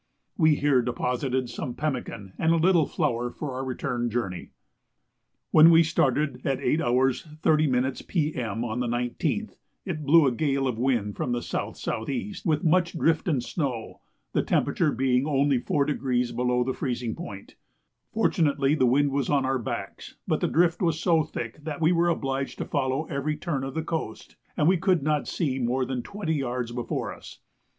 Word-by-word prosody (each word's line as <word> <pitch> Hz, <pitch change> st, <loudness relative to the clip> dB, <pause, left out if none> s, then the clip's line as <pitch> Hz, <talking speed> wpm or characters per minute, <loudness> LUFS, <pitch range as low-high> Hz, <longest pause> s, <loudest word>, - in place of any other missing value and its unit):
We 155 Hz, -3 st, +4 dB
here 140 Hz, -3 st, +3 dB
deposited 125 Hz, +1 st, -1 dB
some 125 Hz, 0 st, -5 dB
pemmican 125 Hz, -10 st, -4 dB
and 160 Hz, -, +3 dB
a -, -, +4 dB
little 165 Hz, -2 st, +3 dB
flour 120 Hz, +1 st, -1 dB
for 145 Hz, +3 st, -6 dB
our 130 Hz, +1 st, -3 dB
return 120 Hz, -2 st, -2 dB
journey. 100 Hz, -6 st, -3 dB, 1.0 s
When 160 Hz, +1 st, +8 dB
we 165 Hz, 0 st, +7 dB
started 145 Hz, -4 st, +1 dB
at 135 Hz, -2 st, 0 dB
8 155 Hz, +6 st, +1 dB
h. 125 Hz, +2 st, +2 dB, 0.2 s
30 155 Hz, -2 st, +3 dB
m. 130 Hz, +1 st, +1 dB
P.M. 125 Hz, -, -1 dB
on 115 Hz, +1 st, -3 dB
the 125 Hz, -, -1 dB
19th 125 Hz, -, -2 dB, 0.3 s
it 165 Hz, -6 st, -4 dB
blew 155 Hz, +2 st, +6 dB
a 135 Hz, -, +3 dB
gale 135 Hz, +1 st, 0 dB
of 120 Hz, -3 st, -2 dB
wind 120 Hz, -5 st, 0 dB
from 120 Hz, -, -1 dB
S.S.E. 120 Hz, -, -3 dB
with 155 Hz, -3 st, +1 dB
much 170 Hz, +1 st, +2 dB
drift 165 Hz, +1 st, +1 dB
and 140 Hz, -8 st, +1 dB
snow, 125 Hz, -7 st, -4 dB, 0.3 s
the -, -, +2 dB
temperature -, -, +1 dB
being 130 Hz, +2 st, +1 dB
only 140 Hz, -2 st, +2 dB
4° 130 Hz, -4 st, 0 dB
below 125 Hz, 0 st, +1 dB
the 130 Hz, +1 st, -2 dB
freezing 120 Hz, -4 st, -3 dB
point. 100 Hz, -1 st, -9 dB, 0.6 s
Fortunately 150 Hz, -10 st, +2 dB
the 130 Hz, -5 st, +3 dB
wind 140 Hz, +3 st, +3 dB
was 140 Hz, -2 st, -1 dB
on 140 Hz, -2 st, +2 dB
our 130 Hz, 0 st, 0 dB
backs; 115 Hz, -, -6 dB
but -, -, +1 dB
the -, -, +2 dB
drift 170 Hz, +2 st, +2 dB
was 165 Hz, -3 st, +1 dB
so 170 Hz, -2 st, +3 dB
thick 145 Hz, -1 st, -7 dB
that 150 Hz, -2 st, -5 dB
we 165 Hz, +1 st, +3 dB
were 175 Hz, 0 st, +3 dB
obliged 135 Hz, -4 st, -2 dB
to -, -, -3 dB
follow 130 Hz, +4 st, -1 dB
every 150 Hz, +1 st, -2 dB
turn 150 Hz, -4 st, -2 dB
of 135 Hz, 0 st, -5 dB
the 160 Hz, -, -1 dB
coast, 160 Hz, -9 st, -5 dB, 0.2 s
and 150 Hz, -, +3 dB
we 185 Hz, +1 st, +5 dB
could 180 Hz, -3 st, +2 dB
not 150 Hz, 0 st, 0 dB
see 135 Hz, -6 st, -1 dB
more 130 Hz, +1 st, 0 dB
than 125 Hz, -1 st, -3 dB
twenty 200 Hz, -, -3 dB
yards 125 Hz, -4 st, -2 dB
before 120 Hz, 0 st, -3 dB
us. -, -, -13 dB
135 Hz, 175 wpm, -26 LUFS, 125-155 Hz, 1.0 s, When